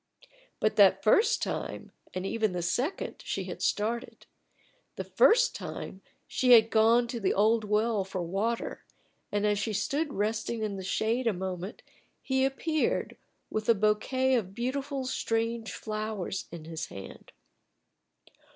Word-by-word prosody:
But 215 - +1
that 195 -2 +6
first 385 - +4
time, - - -4 0.2
and 185 +1 -3
even 215 -1 0
the 175 -1 -2
second, 250 - -2
she - - -3
had - - -7
started. 225 +3 -1 0.7
The - - -4
first - - +4
time 190 - -7 0.2
she 255 -3 +4
had 225 -1 +7
gone 230 +2 +4
to 235 - -3
the 200 - +1
old 220 +2 +3
well 210 0 +1
for 185 -1 -4
water, 205 +7 -2 0.5
and 205 0 0
as 210 -1 +2
she 215 +1 -2
stood 290 +8 -1
resting 220 +2 -1
in 210 -2 -2
the 190 - -6
shade 230 +6 0
a 225 - +3
moment 185 +1 -5 0.4
he 265 -1 0
appeared 300 +3 0 0.4
With 215 +1 -2
a 230 - +7
bouquet 215 +6 +1
of 200 -6 0
beautiful 265 +3 -2
strange 230 -3 -1
flowers 215 -3 -4
in 165 -2 -8
his 160 -1 -5
hand. 95 0 -10
220 Hz, 145 wpm, -29 LUFS, 195-240 Hz, 0.7 s, had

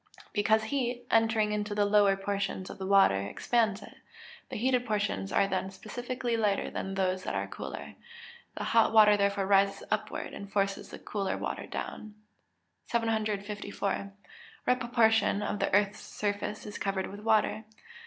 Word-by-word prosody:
_ - - -16
Because 220 +1 +3
heat, 245 0 -2
entering 225 -2 +3
into 210 0 -2
the 205 0 +3
lower 205 -1 +4
portions 195 -1 -3
of - - -11
the 190 - -4
water, 195 - +5
expands 210 - 0
it; - - -14 0.5
the - - -6
heated 250 +2 +1
portions 205 - -1
are 195 - +3
then 190 0 -2
specifically 240 +4 -4
lighter 210 -3 0
than 195 0 -4
those 185 -1 0
that - - -3
are - - -1
cooler; - - -7 0.6
the - - -3
hot 225 -1 +3
water 210 -1 +7
therefore 200 -1 +1
rises 195 0 +3
upward, 215 - -2
and 200 0 -8
forces 195 -1 -1
the - - -8
cooler 200 -2 -3
water - - -4
down. 215 -1 -6 0.7
754. 210 -3 -2 0.6
_What 250 0 +3
proportion 225 -4 +3
of 205 - -2
the - - 0
earth's 205 0 +2
surface 205 0 -3
is 210 - -7
covered 195 -1 -1
with 200 - -8
water? 220 0 +1
205 Hz, 160 wpm, -30 LUFS, 195-220 Hz, 0.7 s, water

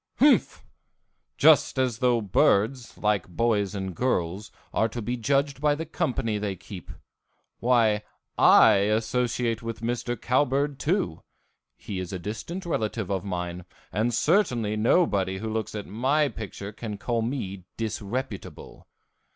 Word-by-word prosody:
Humph! 290 +2 +3 0.7
Just - - +5
as 125 -4 0
though 120 -2 +3
birds, 110 +5 +1
like 105 -3 0
boys 105 +1 0
and 95 -2 -4
girls, 100 -5 -1 0.2
are 110 - +2
to 120 - -6
be 120 +2 -2
judged 135 +3 0
by 150 -1 +3
the 160 +2 -4
company 125 -10 -1
they 100 -2 -2
keep. 90 0 -10 0.7
Why, 115 -4 +3 0.3
I - - +7
associate 115 +1 0
with 115 -1 -6
Mr. 120 +1 -2
Cowbird, 140 +2 +1
too; 170 - -1 0.6
he 95 -3 -6
is 90 -2 -5
a 95 - -3
distant 115 - -6
relative 110 - -2
of 95 -2 -1
mine, 90 -2 -4 0.3
and 110 +4 +1
certainly 120 - +2
nobody 105 - +2
who 110 +2 -4
looks 110 -1 -3
at 105 - -4
my 140 +7 +1
picture 105 -3 -7
can 105 -1 -6
call 115 +2 -1
me 100 -7 -4
disreputable. 115 +2 -5
115 Hz, 135 wpm, -26 LUFS, 100-125 Hz, 0.7 s, I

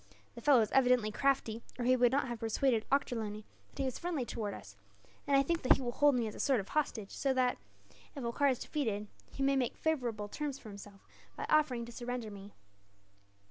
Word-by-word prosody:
The 235 - -10
fellow 270 -2 +6
is 215 - -1
evidently 250 -5 +4
crafty, 235 -2 0 0.2
or 245 - -2
he 255 +1 +5
would 245 -1 +4
not 270 0 +1
have 240 -2 -5
persuaded 225 +1 +1
Ochterlony 220 -6 -1 0.3
that 275 - -4
he - - 0
was 260 - -3
friendly 335 -7 -2
towards 210 -4 -4
us; 100 - -13 0.5
and 280 -1 +4
I 275 - +5
think 330 -2 +3
he - - -7
will 245 -2 -2
hold 290 +2 +4
me 240 -2 +1
as 215 - -4
a - - -10
sort 270 -4 +3
of 195 - -6
hostage 235 -9 -1
so 270 -1 0
that, 255 -1 +1 0.6
if 275 - -5
Holkar 235 +5 +1
is 255 - +1
defeated, 220 -10 -2 0.3
he 275 - -3
may 275 0 +3
make 255 -3 0
favourable 240 -10 -1
terms 285 +5 -4
for 220 - -11
himself 200 -1 -12 0.3
by - - -4
offering 260 -6 +3
to 235 - -10
surrender 240 -2 -4
me." 200 0 -11
245 Hz, 215 wpm, -33 LUFS, 220-275 Hz, 0.6 s, fellow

